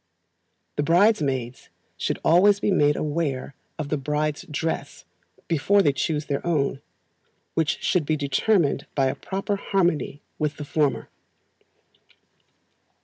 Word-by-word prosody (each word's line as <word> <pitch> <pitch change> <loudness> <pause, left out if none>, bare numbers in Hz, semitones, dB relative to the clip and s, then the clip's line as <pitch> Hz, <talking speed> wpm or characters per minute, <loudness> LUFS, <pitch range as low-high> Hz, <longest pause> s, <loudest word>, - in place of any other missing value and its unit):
The - - +2
bridesmaids 145 - +1 0.3
should - - -2
always 195 +5 +5
be 205 - +1
made 145 -5 +3
aware 145 -4 -2 0.2
of 150 -3 -4
the 150 - 0
bride's 150 +2 -2
dress 160 +2 -3 0.4
before 195 +6 +3
they 145 - +3
choose 150 +2 -1
their 140 -1 -2
own, 145 -5 0 0.7
which 160 -2 0
should 165 -6 +1
be 155 - +1
determined 145 +1 +1
by 135 - +3
a - - -3
proper 200 +1 -3
harmony 175 -8 0 0.2
with 150 -1 -1
the 150 - -6
former. 145 -1 0
150 Hz, 125 wpm, -24 LUFS, 145-175 Hz, 0.7 s, always